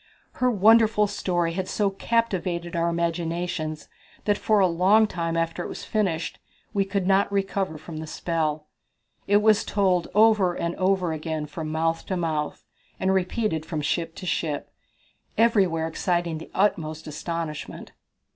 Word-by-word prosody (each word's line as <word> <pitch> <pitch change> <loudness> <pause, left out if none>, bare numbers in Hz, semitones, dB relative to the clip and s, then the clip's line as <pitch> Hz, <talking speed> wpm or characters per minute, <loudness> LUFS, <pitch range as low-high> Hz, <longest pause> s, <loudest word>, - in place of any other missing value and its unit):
Her 250 - +4
wonderful 220 0 +5
story 175 -4 -1
had 185 +1 -3
so 200 0 0
captivated 190 -6 -1
our 170 0 +1
imaginations 170 -1 -2 0.4
that 205 - +3
for 215 0 +2
a 190 - +5
long 185 +5 +4
time 165 -4 -2
after 165 +1 -1
it - - -5
was - - -7
finished 185 -7 -1 0.3
we 200 -2 +2
could 195 -1 -1
not 195 +1 +3
recover 195 -4 -1
from 155 +1 -9
the 160 0 -6
spell. 155 -2 -2 0.6
It 205 +1 +4
was 215 -1 +5
told 185 -4 +1
over 210 -5 +5
and 170 0 -2
over 185 -3 +1
again 155 -1 -3
from 155 +1 -6
mouth 165 +1 0
to 185 - -1
mouth, 155 -3 -2 0.3
and 190 0 +2
repeated 185 -3 0
from 155 -1 -4
ship 165 +2 -1
to - - -8
ship, 160 -4 -2 0.7
everywhere 190 -8 +3
exciting 170 -1 -1
the 160 - -10
utmost 160 -6 0
astonishment. 155 0 -5
175 Hz, 150 wpm, -25 LUFS, 165-200 Hz, 0.7 s, wonderful